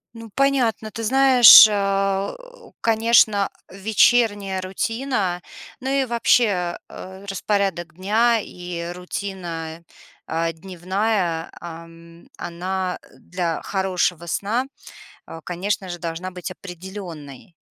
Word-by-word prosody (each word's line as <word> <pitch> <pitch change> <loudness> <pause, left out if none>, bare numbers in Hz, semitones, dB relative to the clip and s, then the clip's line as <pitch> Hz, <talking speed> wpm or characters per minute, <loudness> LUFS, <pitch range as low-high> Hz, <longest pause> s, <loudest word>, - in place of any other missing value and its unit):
Ну, 230 0 -10
понятно. 255 -6 +1
Ты 225 - -6
знаешь, 255 -2 +9
э, 195 -1 0 0.5
конечно, 220 -3 +3 0.2
вечерняя 205 -1 +2
рутина, 195 -1 -2 0.4
ну 265 0 -4
и 275 0 +1
вообще, 220 -7 +1
а, 190 +1 -10
э, - - -12
распорядок 195 -4 -2
дня 225 +5 +2
и 175 -3 -6
рутина, 175 -3 -6 0.4
а, 165 +1 -1
дневная, 185 0 -2
ам, 165 0 -12
она, 180 +2 -4
а, - - -21
для 175 -2 -3
хорошего 180 -3 -1
сна, 215 +9 -1 0.6
а, 165 - -9
конечно 190 +3 -3
же, 175 -1 -6
должна 170 +2 -5
быть 180 0 -7
определённой. 175 -5 -10
190 Hz, 105 wpm, -22 LUFS, 175-215 Hz, 0.6 s, знаешь